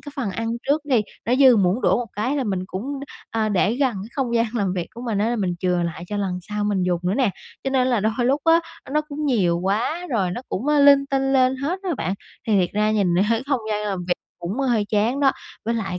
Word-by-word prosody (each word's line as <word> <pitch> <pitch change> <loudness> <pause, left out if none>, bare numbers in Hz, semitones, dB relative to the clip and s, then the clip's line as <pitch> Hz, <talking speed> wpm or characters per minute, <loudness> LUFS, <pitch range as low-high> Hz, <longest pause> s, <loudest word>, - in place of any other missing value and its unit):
cái 290 - -10
phần 245 -8 -2
ăn 225 +4 -3 0.2
trước 290 +3 +2
đi, 260 -6 +3 0.3
nó 240 - +3
dư 260 -3 +7
muỗng 195 +3 +2
đũa - - +3
một 245 - -2
cái 250 +8 -1
là 275 - 0
mình 190 -4 -2
cũng, 265 +10 -5 0.3
a, 220 -1 0
để 205 +2 +2
gần 265 -3 +2
cái 195 +2 -6
không 255 -4 -1
gian 230 0 +3
làm 200 -5 0
việc 180 -2 -3
của 235 - -8
mình 225 -5 -1
á, 230 +4 +1
mình 185 -5 -1
chừa 180 -1 +1
lại 170 0 -4
cho 205 - -4
lần 190 -3 -2
sau 210 +2 -3
mình 205 -3 +1
dùng 180 -1 0
nữa 180 +2 0
nè. 250 -4 +2 0.3
Cho 270 - 0
nên 260 -1 +2
là 240 -4 +2
đôi 220 +2 +1
lúc 275 +4 +2
á, 330 +1 +5 0.3
nó 300 +2 +2
cũng 300 0 -3
nhiều 185 -10 +2
quá 220 - -1
rồi 195 -7 +1
nó 210 - -4
cũng, 225 +9 -3
ơ, 295 0 +3
linh 280 -1 +6
tinh 270 0 +1
lên 260 0 +3
hết 300 +8 -2
á 380 - -2
bạn. 190 - -2 0.3
Thì 215 -3 +3
thiệt 175 - 0
ra 210 +1 +2
nhìn 200 -5 +2 0.3
không 275 -4 +1
gian 210 0 -1
làm 195 -2 -2
việc 175 - +3 0.2
cũng 180 +8 -4
hơi 240 -6 +1
chán 220 +6 0
đó. 275 -1 +4 0.3
Với 230 +2 0
lại 195 -5 -3
225 Hz, 260 wpm, -22 LUFS, 195-270 Hz, 0.3 s, dư